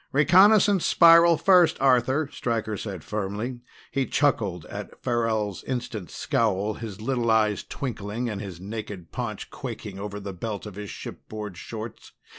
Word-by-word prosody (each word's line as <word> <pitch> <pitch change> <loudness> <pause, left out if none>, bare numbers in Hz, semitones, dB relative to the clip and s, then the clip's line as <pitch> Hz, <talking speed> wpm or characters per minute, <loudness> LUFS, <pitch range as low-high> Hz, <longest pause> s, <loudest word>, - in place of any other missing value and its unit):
"Reconnaissance 190 +6 +5
spiral 170 0 +7
first, 180 -2 +5
Arthur," 130 +3 +3
Stryker 110 -3 -2
said 95 -5 -6
firmly. 105 +4 -4 0.3
He 135 -1 0
chuckled 100 - +1
at - - -8
Farrell's 110 -4 -1
instant 120 -7 -4
scowl, 110 -6 0
his 110 -3 -7
little 120 0 0
eyes 110 -2 +2
twinkling 115 -2 -4
and 105 -3 -4
his 95 -5 -7
naked 100 -3 -7
paunch - - -5
quaking 100 -2 -7
over 105 0 -5
the 100 -1 -6
belt 105 +3 -5
of 105 - -7
his 105 +1 -7
shipboard 105 -3 -7
shorts. 110 +4 -8
110 Hz, 140 wpm, -25 LUFS, 105-130 Hz, 0.3 s, spiral